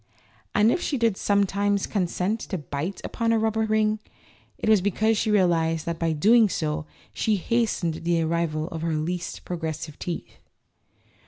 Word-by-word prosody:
And 210 +2 +5
if 350 - 0
she 280 - -1
did 230 -4 +2
sometimes 200 0 +1
consent 195 +2 -1
to 190 - -4
bite 150 +5 -4
upon 230 -1 -1
a 225 - +3
rubber 220 0 +1
ring, 215 0 +2 0.6
it - - -4
was 215 -3 +5
because 215 +3 +2
she 215 - 0
realized 165 -5 +2
that 170 -1 -3
by 165 - +1
so 160 - -1
doing 170 -6 +3 0.3
she 220 -2 +1
hastened 195 -6 -1
the 170 0 +2
arrival 160 -1 -1
of 165 -3 -5
her 165 -1 -1
least 170 +3 -3
progressive 160 -3 -5
teeth. 175 -2 -6
185 Hz, 160 wpm, -25 LUFS, 165-215 Hz, 0.6 s, And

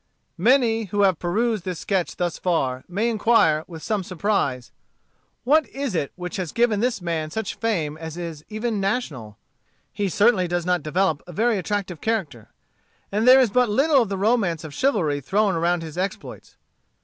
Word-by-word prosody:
Many 225 +1 +3
who 205 +1 0
have 190 -4 +3
perused 215 +3 0
this 180 -2 -4
sketch 190 -1 -1
thus 175 -1 -2
far, 135 -8 -1
may 200 +6 -1
inquire, 215 -9 +3
with 160 -3 -10
some 210 0 -1
surprise, 175 - -1 0.7
"What 300 +4 +3
is 275 -5 -4
it 150 -5 -1
which 180 +3 -6
has 180 -4 -3
given 235 -3 +2
this 240 -4 -1
man 160 -2 -2
such 220 +7 -3
fame 160 -10 -2
as 160 0 -7
is 165 -4 -6
even 215 -1 -2
national? 150 - -3 0.6
He 200 -1 -1
certainly 205 -1 +3
does 175 0 -2
not 180 -2 +1
develop 160 0 0
a - - -8
very 225 +3 +1
attractive 190 -4 -3
character; 175 - -3 0.6
and 215 +4 0
there 260 +1 +9
is 240 -5 +2
but 250 +1 +3
little 275 +5 +4
of 225 - -1
the 195 - -2
romance 200 -5 +1
of 155 -2 -8
chivalry 160 - 0
thrown 200 +7 +1
around 170 0 0
his 160 +1 -7
exploits. 190 +1 -5
190 Hz, 175 wpm, -23 LUFS, 165-225 Hz, 0.7 s, there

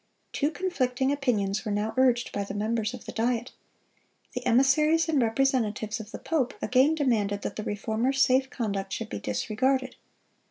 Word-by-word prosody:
Two 290 - +1
conflicting 270 -6 -1
opinions 215 -8 0
were 215 - -3
now 210 +2 -1
urged 250 -2 +2
by 200 - -2
the 200 0 -6
members 220 +2 -1
of 245 - -12
the - - -6
Diet. 235 +1 -1 0.8
The - - -4
emissaries 300 +6 +4
and 305 -4 +2
representatives 225 -3 0
of 220 -1 -8
the - - -7
pope 275 -6 -1
again 265 +5 +3
demanded 215 -9 0
that - - -4
the - - -4
Reformer's 220 +6 -1
safe 265 0 +3
conduct 195 -6 -3
should - - -4
be 105 - -4
disregarded. 255 - -1
245 Hz, 165 wpm, -27 LUFS, 215-270 Hz, 0.8 s, emissaries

